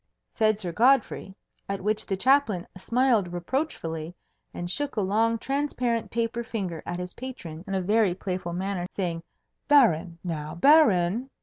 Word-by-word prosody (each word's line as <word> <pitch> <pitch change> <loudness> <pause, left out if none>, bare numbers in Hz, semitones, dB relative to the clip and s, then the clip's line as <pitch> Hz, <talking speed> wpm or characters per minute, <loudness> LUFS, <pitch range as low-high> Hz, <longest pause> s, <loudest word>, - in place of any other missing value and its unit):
said 215 -2 +2
Sir 180 -5 -4
Godfrey; 235 -2 +2 0.3
at 195 0 -2
which 215 +1 0
the 195 - -1
Chaplain 230 -5 +3
smiled 230 -1 +1
reproachfully, 175 - -3 0.4
and 175 - -5
shook 285 +10 -3
a 215 - +1
long 225 +4 +2
transparent 250 -3 -1
taper 235 +1 -2
finger 195 -9 -4
at 175 - -3
his 180 0 -6
patron 180 -11 -8
in 195 - -2
a 190 - 0
very 205 -1 +2
playful 180 -2 -4
manner, 185 0 -2
saying, 170 -4 -2 0.5
"Baron! 180 - +4
now, 155 -3 -4
Baron!" 235 - +4
200 Hz, 145 wpm, -26 LUFS, 175-235 Hz, 0.5 s, Baron